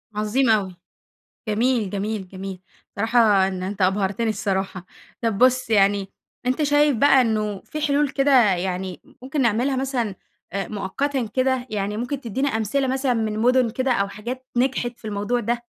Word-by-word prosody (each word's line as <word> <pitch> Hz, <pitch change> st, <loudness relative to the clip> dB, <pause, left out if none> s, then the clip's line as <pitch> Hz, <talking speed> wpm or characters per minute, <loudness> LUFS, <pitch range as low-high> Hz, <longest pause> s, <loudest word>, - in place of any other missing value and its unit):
عظيم 220 Hz, +4 st, +1 dB
أوي، 195 Hz, -4 st, +1 dB, 0.7 s
جميل، 225 Hz, -1 st, +1 dB
جميل، 205 Hz, -1 st, -3 dB
جميل. 190 Hz, -1 st, -7 dB, 0.4 s
صراحة 215 Hz, -3 st, +4 dB
إن 185 Hz, -1 st, -5 dB
أنت 190 Hz, 0 st, -3 dB
أبهرتني 195 Hz, +4 st, +1 dB
الصراحة، 190 Hz, -3 st, -2 dB, 0.4 s
طب 225 Hz, -3 st, 0 dB
بُصّ 255 Hz, -1 st, +3 dB
يعني، 200 Hz, -1 st, +3 dB, 0.4 s
أنت 255 Hz, +4 st, +1 dB
شايف 290 Hz, -2 st, +3 dB
بقى 270 Hz, +1 st, +5 dB
إنّه 215 Hz, -4 st, 0 dB
في 305 Hz, -, -6 dB
حلول 290 Hz, -1 st, +2 dB
كده 265 Hz, -9 st, +4 dB
يعني 185 Hz, 0 st, -3 dB, 0.2 s
ممكن 270 Hz, +1 st, -1 dB
نعملها 245 Hz, +4 st, +1 dB
مثلًا، 255 Hz, -6 st, -1 dB, 0.4 s
آآ 195 Hz, 0 st, -3 dB
مؤقتًا 245 Hz, +5 st, -2 dB
كده؟ 260 Hz, -1 st, +1 dB
يعني 205 Hz, 0 st, -2 dB
ممكن 250 Hz, +4 st, -3 dB
تدينا 265 Hz, +4 st, -1 dB
أمثلة 225 Hz, +4 st, 0 dB
مثلًا 265 Hz, -1 st, +1 dB
من 215 Hz, -1 st, -1 dB
مُدن 250 Hz, 0 st, +3 dB
كده 260 Hz, +2 st, 0 dB
أو 200 Hz, -3 st, 0 dB
حاجات 245 Hz, +6 st, -7 dB
نجحت 250 Hz, -1 st, +1 dB
في -, -, -26 dB
الموضوع 210 Hz, +4 st, -1 dB
ده. 240 Hz, +2 st, -2 dB
225 Hz, 155 wpm, -23 LUFS, 200-260 Hz, 0.7 s, بقى